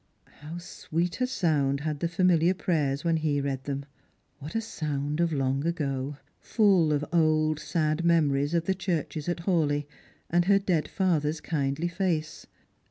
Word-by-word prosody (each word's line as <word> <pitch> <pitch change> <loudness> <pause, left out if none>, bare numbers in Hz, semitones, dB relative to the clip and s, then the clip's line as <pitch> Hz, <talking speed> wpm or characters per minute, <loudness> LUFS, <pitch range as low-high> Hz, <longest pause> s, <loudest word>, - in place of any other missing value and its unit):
How 155 +4 -7
sweet 175 +2 -3
a 255 - +3
sound 145 - +1
had 150 -1 -3
the 170 - 0
familiar 175 0 +3
prayers 150 -7 0
when 165 -1 +2
he 155 -2 0
read 135 -2 -3
them! 140 0 -3 0.5
what 150 +6 -8
a - - +2
sound 150 -7 -3
of 170 -1 +2
long 135 -1 0
ago! 145 -4 -2
— - - -41
full 195 -8 +3
of 150 0 0
old 155 -2 +3
sad 155 0 -1
memories 150 -3 +2
ot 170 -1 +1
the 190 - +2
churches 175 -4 -3
at 170 -1 -2
Hawleigh, 155 -5 +1 0.4
and 175 +1 +2
her 200 +1 +5
dead 180 -6 0
father's 160 -5 0
kindly 150 +1 -1
face. 170 -4 -2
155 Hz, 165 wpm, -27 LUFS, 145-175 Hz, 0.5 s, her